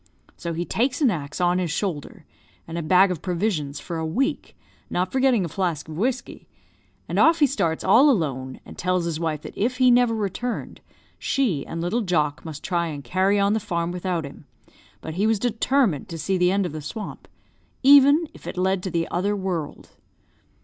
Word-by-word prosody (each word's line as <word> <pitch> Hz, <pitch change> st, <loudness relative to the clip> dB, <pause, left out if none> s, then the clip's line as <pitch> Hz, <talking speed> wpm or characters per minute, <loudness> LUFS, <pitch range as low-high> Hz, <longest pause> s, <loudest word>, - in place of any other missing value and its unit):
So 170 Hz, -1 st, -5 dB
he 170 Hz, +2 st, -3 dB
takes 255 Hz, +7 st, 0 dB
an 265 Hz, -6 st, +4 dB
axe 150 Hz, -3 st, -5 dB
on 175 Hz, 0 st, +2 dB
his 180 Hz, -2 st, -1 dB
shoulder, 160 Hz, -2 st, -4 dB, 0.4 s
and 165 Hz, -, -7 dB
a 170 Hz, -, -2 dB
bag 185 Hz, +4 st, +4 dB
of 175 Hz, -, -4 dB
provisions 170 Hz, -6 st, -2 dB
for 170 Hz, -2 st, -5 dB
a -, -, -3 dB
week, 220 Hz, +13 st, -2 dB, 0.3 s
not 180 Hz, +1 st, -1 dB
forgetting 260 Hz, -7 st, +2 dB
a -, -, -3 dB
flask 170 Hz, -3 st, -2 dB
of 155 Hz, -, -8 dB
whiskey, 245 Hz, +8 st, -3 dB, 0.6 s
and -, -, -1 dB
off 330 Hz, 0 st, +6 dB
he 300 Hz, -, +5 dB
starts 170 Hz, -, -1 dB
all 245 Hz, +10 st, +6 dB
alone, 135 Hz, -, -1 dB
and -, -, -11 dB
tells 180 Hz, -1 st, 0 dB
his 165 Hz, -2 st, -2 dB
wife 155 Hz, -3 st, -2 dB
that -, -, -9 dB
if 245 Hz, +4 st, -1 dB
he 255 Hz, -1 st, +5 dB
never 240 Hz, -1 st, +4 dB
returned, 220 Hz, +3 st, -4 dB, 0.4 s
she 215 Hz, -, 0 dB
and 165 Hz, -, -5 dB
little 190 Hz, +8 st, 0 dB
Jock 155 Hz, -7 st, 0 dB
must 155 Hz, -3 st, -8 dB
try 170 Hz, -1 st, 0 dB
and 145 Hz, -3 st, -6 dB
carry 190 Hz, +4 st, +1 dB
on 200 Hz, +1 st, +3 dB
the 220 Hz, -, +1 dB
farm 170 Hz, -5 st, -2 dB
without 180 Hz, -2 st, -2 dB
him; 140 Hz, -, -12 dB, 0.5 s
but 160 Hz, -, -6 dB
he 200 Hz, +6 st, +1 dB
was 220 Hz, -1 st, +2 dB
determined 230 Hz, -, +1 dB
to 165 Hz, -, -6 dB
see 190 Hz, +4 st, -1 dB
the 180 Hz, 0 st, +3 dB
end 195 Hz, 0 st, +1 dB
of 175 Hz, -, -3 dB
the 155 Hz, 0 st, -6 dB
swamp, 205 Hz, +9 st, -7 dB, 0.6 s
even 285 Hz, +4 st, +7 dB
if -, -, -13 dB
it -, -, -6 dB
led 190 Hz, 0 st, +1 dB
to 185 Hz, -, -4 dB
the 165 Hz, -1 st, -1 dB
other 200 Hz, +4 st, 0 dB
world. 185 Hz, -6 st, -4 dB
185 Hz, 200 wpm, -24 LUFS, 165-220 Hz, 0.6 s, even